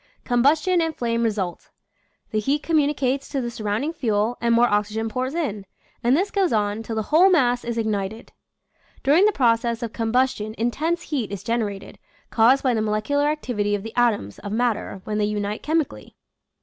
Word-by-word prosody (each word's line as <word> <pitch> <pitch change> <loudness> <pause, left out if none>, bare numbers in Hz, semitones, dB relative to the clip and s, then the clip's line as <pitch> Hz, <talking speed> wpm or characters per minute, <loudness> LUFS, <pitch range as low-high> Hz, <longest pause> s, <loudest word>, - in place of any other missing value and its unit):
Combustion 300 +8 +3
and 325 -1 -1
flame 235 -1 -1
result. 205 -6 -2 0.6
The 215 - +1
heat 280 +8 0
communicates 280 -4 0
to 280 - -2
the 240 -2 -3
surrounding 220 +8 -2
fuel 225 -5 0
and 235 0 +1
more 235 +1 +5
oxygen 210 +1 -1
pours 255 +6 -3
in, 215 - -2 0.4
and 245 +4 +4
this 390 +4 0
goes 390 -4 +1
on 210 0 0
till 225 0 -5
the 220 - -1
whole 360 +5 +7
mass 245 -9 +2
is 235 0 -4
ignited. 215 -1 -3 0.7
During 305 +9 +5
the 425 - +4
process 235 - +1
of 230 - -5
combustion 225 -2 0
intense 315 +9 -1
heat 255 -9 -3
is 200 -1 -6
generated, 215 -4 -3 0.3
caused 245 +4 +4
by 255 -2 +2
the 220 - 0
molecular 220 +7 0
activity 225 -9 -1
of 200 - -5
the 225 0 -7
atoms 225 - +1
of 205 - -6
matter 225 -4 -1
when 210 0 -3
they 210 - +2
unite 210 0 -2
chemically. 315 -1 -2
235 Hz, 175 wpm, -23 LUFS, 215-280 Hz, 0.7 s, whole